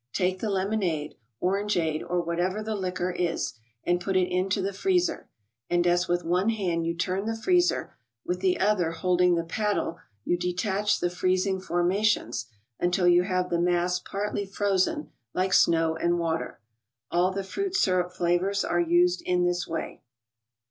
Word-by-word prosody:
Take 185 0 0
the 220 - -2
lemonade, 190 -6 -1 0.3
orangeade, 180 -5 0
or 175 0 -1
whatever 180 +5 -1
the 220 0 -3
liquor 185 -2 -2
is, 175 -4 -1 0.3
and 175 0 +1
put 190 +1 0
it 180 -1 +1
into 185 +2 0
the 195 +1 -2
freezer; 360 - 0 0.4
and 175 0 +2
as 175 +1 +2
with 175 0 0
one 180 +5 +1
hand 175 -7 -1
you 170 - -1
turn 185 +3 -1
the 225 - -1
freezer, 355 +8 +1 0.3
with 180 +1 -2
the 185 -1 +1
other 190 -5 +2
hold¬ 180 +1 +1
ing 180 -1 +5
the 170 - 0
paddle 200 -1 -1 0.3
you 175 - +1
detach 195 +3 0
the 175 - 0
freezing 185 +1 0
formations, 175 - 0 0.3
until 175 +1 +2
you 175 0 +6
have 180 -1 -1
the 170 0 +1
mass 175 +1 +1
partly 200 +2 -3
frozen, 200 - 0 0.2
like 185 0 +1
snow 165 -1 +4
and 170 +2 +1
water. 165 -6 -2 0.5
All 175 +2 +3
the 195 +1 -3
fruit 390 - -3
syrup 185 - +2
flavors 180 +3 0
are 175 - +1
used 175 +1 +3
in 180 0 +1
this 175 0 0
way. 165 - -5
180 Hz, 165 wpm, -27 LUFS, 175-195 Hz, 0.5 s, you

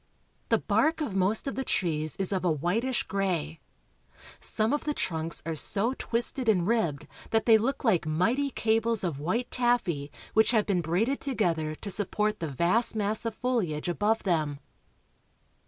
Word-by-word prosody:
The - - +4
bark 320 +1 +1
of 270 -11 -3
most 195 +7 +1
of 275 - -2
the 265 - -2
trees 155 - -1
is 195 -1 0
of 190 -3 -1
a 175 - +2
whitislj 200 - -1
gray. 175 -5 -2 0.8
Some 220 +4 0
of 295 - -1
the 295 -1 -2
trunks 165 -1 -2
are 165 - -2
so 205 - +1
twisted 240 +1 0
and 180 -5 +3
ribbed 175 -10 0 0.2
that 225 0 +1
they 225 -2 +6
look 260 +6 -2
like 190 -10 +2
mighty 230 - +1
cables 225 -2 +1
of 165 -6 -2
white 220 +11 -2
taffy 210 - 0 0.2
which 220 0 +4
have 215 -2 +3
been 190 -4 +1
braided 195 - 0
together 165 - -1
to 200 - -8
support 210 +2 -1
the 165 - -3
vast 175 - +2
mass 215 +2 -1
of 225 - -4
foliage 210 -13 -1
above 210 +5 0
them. 155 -6 0
205 Hz, 170 wpm, -28 LUFS, 165-230 Hz, 0.8 s, they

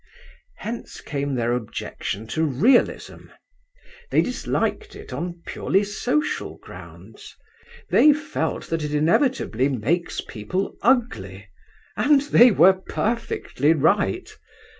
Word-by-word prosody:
Hence 230 +2 -7
came 140 -2 -3
their 120 -1 0
objection 110 -2 -5
to 160 +8 -1
realism. 170 - +1 0.8
They - - +3
disliked 425 -2 -2
it 420 +1 -10
on 175 0 -5
purely 195 +2 0
social 245 +8 -2
grounds. - - -13 0.6
They 300 - +7
felt 290 - -3
that 165 -1 -1
it 150 0 -2
inevitably 155 - +1
makes 140 +8 -1
people 125 - -4
ugly, 245 -1 0 0.5
and 290 -1 +4
they 250 -4 +6
were 190 -3 +6
perfectly 190 - -1
right. 200 - 0
180 Hz, 105 wpm, -23 LUFS, -, 0.8 s, They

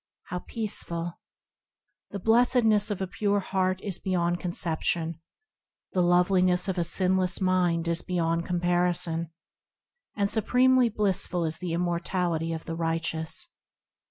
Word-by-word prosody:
How 180 - -3
peaceful! 175 -6 -4 0.9
The 200 - -5
blessedness 225 0 +3
of 205 -2 -3
a - - -3
pure 205 +2 0
heart 185 -1 -1
is 195 -4 -3
beyond 175 -2 0
conception; 165 -1 +1 0.7
The 185 - +2
loveliness 180 +1 +3
of 190 -2 -1
a - - +2
sinless 185 +1 +1
mind 180 -3 +1
is 170 0 0
beyond 170 -2 -1
comparison; 175 -2 0 0.9
And 200 -1 +1
supremely 250 +3 +3
blissful 190 -4 0
is 160 0 -3
the 175 -2 -3
immortality 170 -1 -1
of 160 -1 -5
the 165 - -4
righteous. 165 - -2
180 Hz, 125 wpm, -27 LUFS, 170-195 Hz, 0.9 s, blessedness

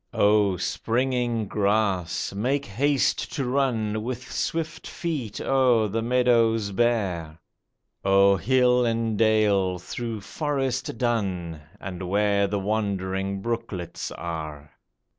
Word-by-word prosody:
O 100 -2 +3
springing 120 +4 0
grass! 100 -4 0
make 130 +8 0
haste 135 +6 +1
to 140 -4 -1
run 120 -5 0
With 125 +2 -5
swift 160 -1 -3
feet 150 - -4
o'er 125 -5 +3
the 115 +3 -1
meadows 115 -3 +2
bare; 95 -8 0 0.7
O'er 100 0 +5
hill 125 +4 +3
and 115 -1 0
dale, 105 -4 +3
through 115 +4 -5
forest 135 -1 -2
dun, 95 -9 -1 0.2
And 90 -1 -6
where 100 0 +2
the 100 +1 -1
wandering 95 -1 -2
brooklets 115 -7 -4
are 75 -3 -6
110 Hz, 105 wpm, -25 LUFS, 95-125 Hz, 0.7 s, O'er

